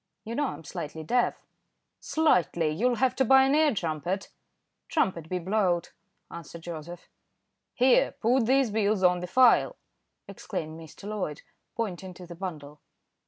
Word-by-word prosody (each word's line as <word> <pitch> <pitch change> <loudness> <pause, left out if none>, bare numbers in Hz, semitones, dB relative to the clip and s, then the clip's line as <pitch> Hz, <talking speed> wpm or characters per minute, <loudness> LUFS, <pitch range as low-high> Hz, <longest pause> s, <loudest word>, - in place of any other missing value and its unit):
"You 225 - -6
know 290 +3 0
I'm - - -7
slightly 160 -1 -6
deaf." 245 +10 0 0.5
"Slightly! 175 - +2
You'll 240 +10 +1
have 255 +2 +1
to 265 - +4
buy 265 +2 +6
an 270 +1 +2
ear 305 0 +4
trumpet." 175 +2 -3 0.6
"Trumpet 175 - -1
be 185 - -1
blowed," 180 -1 0 0.4
answered 170 0 -9
Joseph. 170 +1 -8 0.7
"Here, 255 0 +4
put 235 +1 +1
these 265 -3 +3
bills 205 -2 +1
on 180 0 +4
the 180 - -5
file," 230 - +4 0.5
exclaimed 155 +1 -6
Mr. 165 +5 -11
Loyd, 195 -9 -4 0.3
pointing 190 -5 -4
to 180 - -10
the 175 - -9
bundle. 150 -5 -7
185 Hz, 145 wpm, -27 LUFS, 165-240 Hz, 0.7 s, buy